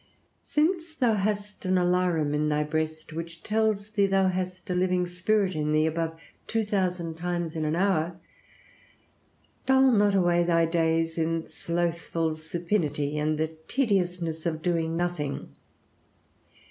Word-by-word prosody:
Since 325 +1 0
thou 245 -6 +3
hast 205 0 -2
an 185 -1 +2
alarum 175 -4 +2
in 150 +1 +1
thy 150 0 +1
breast, 155 +1 -3
which 165 +1 -6
tells 215 -1 0
thee 200 -2 +3
thou 195 -1 +3
hast 185 0 -4
a - - +1
living 180 0 +1
spirit 185 +2 +1
in 150 -1 -1
thee 155 0 +3
above 160 0 -2 0.3
two 225 0 0
thousand 180 -5 -1
times 175 -1 -2
in 155 -1 -1
an 155 +1 0
hour, 175 -2 +1 1.5
dull 265 0 +5
not 205 -3 +4
away 175 -2 +3
thy 165 -1 +3
days 165 0 +1
in 165 0 0
slothful 170 -1 -2
supinity 155 -2 -2
and 155 +1 0
the 160 +1 -2
tediousness 180 - 0
of 155 -1 -3
doing 165 -2 0
nothing. 175 -5 -3
175 Hz, 140 wpm, -27 LUFS, 160-195 Hz, 1.5 s, dull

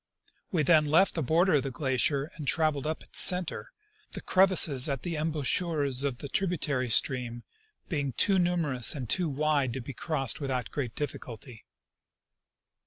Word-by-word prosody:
We 165 -5 +1
then 155 +1 +4
left 160 +6 +3
the 165 - -3
border 165 +6 +2
of - - 0
the 135 - -4
glacier 135 +2 -1
and 150 -3 -8
traveled 155 -2 0
up 155 - -4
its - - 0
center, 180 -3 +2 0.4
the - - -4
crevasses 170 -8 +4
at 135 -3 -4
the 170 -2 -4
embouchures 150 -2 -1
of 135 -4 -2
the 140 - -8
tributary 145 -7 -2
stream 120 0 0 0.4
being 145 -5 -3
too 195 - +2
numerous 165 -7 +1
and 130 -4 -6
too 175 - 0
wide 145 -3 0
to 135 - -4
be 130 +2 -8
crossed 145 0 -4
without 130 -4 -3
great 130 -6 -5
difficulty. 125 -4 -8
145 Hz, 160 wpm, -28 LUFS, 130-165 Hz, 0.4 s, then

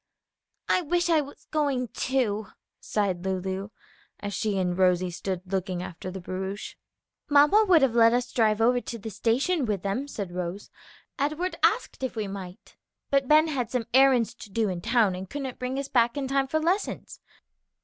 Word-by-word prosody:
"I - - +3
wish 345 +1 0
I 315 -2 +4
was 285 0 -11
going, 280 -5 0
too!" 220 -6 -1 0.3
sighed 190 -4 -1
Lulu, 190 +1 -3 0.5
as 205 0 -5
she 210 -2 -1
and 180 -1 0
Rosie 180 -1 +2
stood 185 +1 -4
looking 185 -1 -2
after 180 +1 -7
the 190 +1 -6
barouche. 190 +3 -5 0.6
"Mamma 295 +10 +6
would 340 -6 +6
have 260 -4 +3
let 230 -1 +6
us 245 +1 0
drive 220 -2 +2
over 245 +2 +3
to 235 - -6
the 220 0 -7
station 260 - +1
with 210 -6 -2
them," 200 +8 -2
said 200 -9 -5
Rose; 180 +2 -5 0.5
"Edward 305 +6 -1
asked - - +1
if 260 -2 -3
we 215 -2 -2
might, 190 -2 -9 0.3
but 275 -1 +2
Ben 310 +2 +6
had 255 -6 -2
some 250 -3 -2
errands 260 -3 +5
to 210 - -12
do 215 +1 0
in 180 -2 -4
town, 225 -2 +2
and 185 +1 -7
couldn't 270 -3 -5
bring 255 +1 -3
us 275 0 -3
back 240 0 +2
in 275 -2 -2
time 270 0 +1
for 315 +4 0
lessons." 360 +6 -2
230 Hz, 180 wpm, -26 LUFS, 190-275 Hz, 0.6 s, Mamma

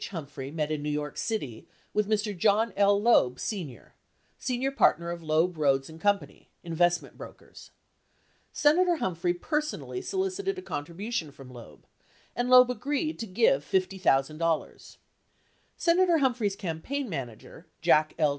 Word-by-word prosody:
Humphrey 140 -6 -7
met 155 0 -3
in 155 -1 -2
New 150 - -3
York 150 -1 -3
City 145 - -4 0.3
with 210 0 0
Mr. 210 -1 0
John 210 +3 +2
L. 200 0 +4
Loeb, 170 - +3
Sr., 170 - -6 0.5
senior 260 +1 -1
partner 170 - +2
of 170 0 -6
Loeb, 160 +2 +1
Rhoades, 135 -2 +2
and 160 0 -12
Co. 205 0 +4 0.5
(investment 175 +1 0
brokers). - - -12 0.8
Senator 350 +4 +3
Humphrey 175 - -1
personally 300 - -3
solicited 385 +1 -2
a 370 - -7
contribution 170 - -4
from 135 -2 -13
Loeb, 120 -2 -13 0.5
and 245 +1 -1
Loeb 250 0 +7
agreed 290 +6 -2
to 225 - -4
give 185 - +2
$50,000. 165 -4 -1 0.8
Senator 345 0 +3
Humphrey's 245 -8 0
campaign 205 - -4
manager, 130 - -8 0.2
Jack 155 0 +3
L. 155 -3 +3
190 Hz, 135 wpm, -28 LUFS, 155-250 Hz, 0.8 s, Loeb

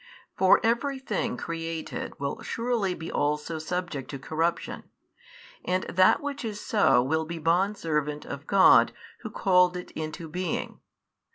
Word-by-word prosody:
For 190 -1 +5
every 240 +5 +1
thing 240 -3 -2
created 165 -1 -5
will 140 0 -3
surely 230 -6 -1
be 160 - -7
also 150 +2 -1
subject 175 -4 -4
to 140 - -5
corruption, 160 +5 -2 0.8
and 185 +1 0
that 185 +1 +4
which 285 -1 -4
is 215 -2 -4
so 205 - +3
will 160 +4 0
be 170 +2 -6
bondservant 165 -3 0
of 140 +2 -7
God 195 -1 +6 0.3
Who - - -7
called 180 -2 +3
it 180 - -8
into 155 +1 -6
being. 175 +1 -3
175 Hz, 140 wpm, -27 LUFS, 155-195 Hz, 0.8 s, God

